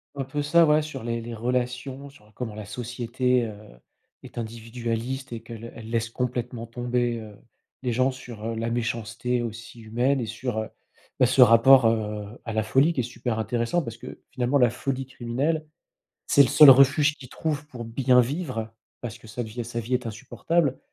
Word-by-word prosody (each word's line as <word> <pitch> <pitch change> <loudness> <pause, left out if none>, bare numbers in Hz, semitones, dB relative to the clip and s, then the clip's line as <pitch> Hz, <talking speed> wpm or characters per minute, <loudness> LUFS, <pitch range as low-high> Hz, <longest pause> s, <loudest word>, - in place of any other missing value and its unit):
Un 140 - -2
peu 135 +3 -3
ça, 165 +3 +5
ouais, 150 0 +4
sur 150 -5 -7
les 115 0 -2
les 115 +1 -7
relations, 125 +4 -3
sur 105 -7 -20
comment 110 -2 -5
la 105 -1 -7
société, 125 +2 -1
heu, 110 - -6 0.7
est - - -13
individualiste 115 +3 -4
et 115 -1 -5
qu'elle 115 0 -9
elle 110 -1 -9
laisse 115 -1 -1
complètement 120 -1 -3
tomber, 120 0 -1
heu, 105 -2 -11 0.5
les 125 - 0
gens, 130 +3 +2
sur, 120 -4 -10
heu, 115 0 -2
la 115 +1 -2
méchanceté 120 +1 -2
aussi 115 +1 -7
humaine 120 +5 +1
et 120 - -2
sur, 125 +1 -4
heu, 110 - -4 0.5
bah, - - +6
ce 130 +2 +4
rapport, 125 +2 +7
heu, 105 -2 0 0.2
à 115 - -4
la 110 0 +1
folie 135 +9 +3
qui 130 - 0
est - - -3
super 120 -1 -3
intéressant. 115 - 0
Parce 115 -3 -7
que, 125 +2 -10
finalement, 125 +2 +1
la 125 -3 +5
folie 135 +2 -3
criminelle, 135 +5 -2 0.6
c'est 140 - +6
le - - +2
seul 150 -2 +9
refuge 140 +3 +6
qu'il 130 - -11
trouve 150 0 -3
pour 125 -5 -8
bien 125 +2 +3
vivre, 125 -5 -3 0.3
parce 120 -1 -6
que 115 - -16
sa 115 +3 -4
d 110 - -8
vie 120 +2 -5
sa 120 0 -4
vie 115 +3 -4
est 125 0 0
insupportable. 135 +6 -1
120 Hz, 195 wpm, -25 LUFS, 115-130 Hz, 0.7 s, seul